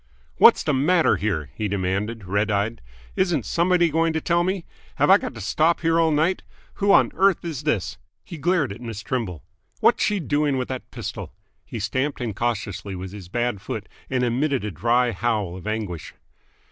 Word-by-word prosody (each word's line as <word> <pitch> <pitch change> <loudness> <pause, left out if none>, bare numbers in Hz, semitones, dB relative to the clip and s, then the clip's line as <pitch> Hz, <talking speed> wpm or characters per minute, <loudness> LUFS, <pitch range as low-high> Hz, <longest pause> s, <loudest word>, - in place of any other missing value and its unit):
"What's - - +7
the 150 - +1
matter 160 +6 +3
here?" 90 -8 -2
he 110 - -2
demanded, 100 +3 -2
red 100 +4 0
eyed. 105 +3 -1 0.3
"Isn't 175 - +1
somebody 175 -1 +2
going 165 +1 +2
to 160 - 0
tell 170 +2 +1
me? 185 -1 -2 0.3
Have - - +4
I - - +8
got - - -6
to - - -7
stop 160 - +2
here 165 0 +2
all 165 -1 +4
night? 160 +5 +1 0.4
Who 200 0 +4
on - - +5
earth 195 -2 +2
is 150 -4 -5
this?" 110 -7 -1 0.2
He 170 -4 -9
glared 160 - +1
at 115 - -12
Miss 115 -4 -6
Trimble. 100 - -3 0.4
"What's - - +3
she 210 -1 +1
doing 145 -3 0
with 125 - -3
that 130 -1 -5
pistol?" - - -7 0.3
He - - -7
stamped 130 +8 -1
incautiously 105 -4 -3
with 95 0 -6
his 95 -3 -10
bad 120 -1 -1
foot, - - -5 0.2
and 125 -1 0
emitted 130 +2 0
a 105 - -3
dry 120 +7 +2
howl 105 -4 -1
of 95 +2 -9
anguish. 105 -7 -4
120 Hz, 185 wpm, -23 LUFS, 105-160 Hz, 0.4 s, I